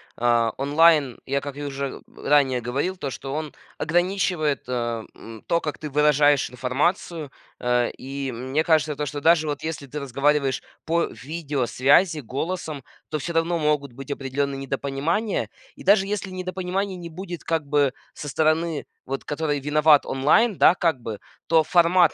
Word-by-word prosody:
а, 115 -1 +2
онлайн, 145 -1 +4
я, 140 +1 -1
как 145 0 -7
и 145 - -5
уже 140 -1 -4
ранее 135 -4 +2
говорил, 140 +11 -2
то, 140 - -4
что 135 +1 -6
он 155 0 -4 0.2
ограничивает, 175 -3 0
а, 120 -2 -2
м, 115 -1 -11
то, 170 - +2
как 150 -3 -4
ты 150 - -5
выражаешь 145 -2 +3
информацию. 145 +5 -1 0.3
А, 125 0 +1
и 135 +1 -5
мне 130 +6 -1
кажется, 155 -2 +2
то, 150 - -2
что 145 +1 -4
даже 160 0 +4
вот 145 -1 -3
если 160 -3 -4
ты 150 +3 -5
разговариваешь 140 +1 +1 0.2
по 170 +1 +2
видеосвязи 145 +2 +1
голосом, 155 +3 -4 0.3
то 155 - -2
всё 170 +5 -4
равно 165 +1 +1
могут 150 -3 0
быть 135 +3 -9
определенные 140 0 -2
недопонимания. 140 - -1 0.3
И - - -12
даже 195 0 +5
если 205 -1 -3
недопонимания 185 +1 -3
не 175 -2 -8
будет, 175 +1 -7
как 165 -2 -1
бы, 140 -2 +2 0.2
со 145 - -7
стороны, 155 +1 +1 0.2
вот, 135 +1 -4
которой 150 -1 -1
виноват 150 +1 +4
онлайн, 170 - +3
да, 170 - +6
как 165 -8 0
бы, 110 -3 -5 0.3
то 160 -1 +5
формат 175 0 +4
150 Hz, 160 wpm, -24 LUFS, 135-165 Hz, 0.3 s, да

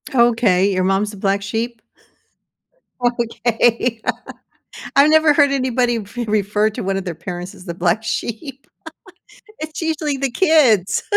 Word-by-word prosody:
Okay, 225 -6 +3
your 185 0 0
mom's 195 +2 0
the 205 - -11
black 195 +1 0
sheep? 225 +3 -4 1.2
Okay. 235 -1 0 0.9
I've 280 +2 +6
never 315 -1 +5
heard 285 -1 +4
anybody 250 -3 0
re 225 +4 -6
refer 210 0 +1
to 240 - -6
one 195 -1 -1
of 195 - -4
their 175 -3 -4
parents 175 +2 -7
as 180 - -14
the 170 - -5
black 175 +5 0
sheep. 245 +4 -5 0.9
It's 310 0 -6
usually 315 -3 -2
the 270 -1 -2
kids. 240 - +3
230 Hz, 140 wpm, -19 LUFS, 200-260 Hz, 1.2 s, I've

